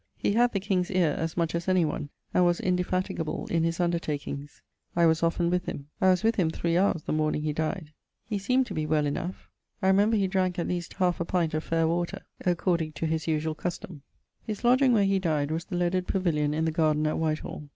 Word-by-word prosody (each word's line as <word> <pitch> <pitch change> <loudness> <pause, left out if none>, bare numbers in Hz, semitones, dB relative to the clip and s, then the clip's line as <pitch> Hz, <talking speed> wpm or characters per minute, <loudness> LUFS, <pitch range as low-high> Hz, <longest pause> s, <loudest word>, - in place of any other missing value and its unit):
He - - 0
had 240 +2 +4
the 200 - -1
king's 185 -2 0
eare 180 -6 +2
as 165 +1 -3
much 170 -2 0
as 170 +1 -3
any 185 -2 +3
one, 150 -1 -3 0.2
and 180 - +4
was 175 0 +2
indefatigable 180 -3 -1
in 165 -1 +2
his 165 +1 -1
undertakings. 150 -4 -3 0.3
I 170 0 +4
was 160 0 +3
often 170 +1 +1
with 180 0 0
him. 140 +1 -6
I 190 - +5
was 180 -1 +3
with 225 +1 +2
him 175 -5 +2
three 165 +1 -1
houres 175 -3 +2
the - - -2
morning 155 -1 0
he 155 -1 -1
dyed; 155 0 -3 0.3
he 210 -3 -2
seemed 255 +6 +2
to - - -7
be 155 -1 -2
well 150 -1 +2
enough. 170 +5 -4 0.3
I 200 - -3
remember 205 +4 +4
he 195 -2 +2
dranke 185 -2 0
at 170 - -1
least 175 -1 -3
1/2 180 -2 +1
pint 170 -4 0
of 155 0 -1
faire 165 -1 +1
water, 170 +1 -2 0.2
according 175 -3 0
to 150 - -3
his 160 0 -1
usuall 155 0 0
custome. 175 -2 -5 0.4
His 215 0 -6
lodgeing 255 +2 +5
where 210 -3 +4
he 195 0 +2
dyed 155 -5 0
was 160 +1 -2
the 190 - -5
leaded 180 +1 0
pavillion 150 -6 0
in 160 +1 0
the 160 - +1
garden 155 -1 +2
at 155 - 0
Whitehall. 155 -2 -3
170 Hz, 225 wpm, -27 LUFS, 155-185 Hz, 0.4 s, I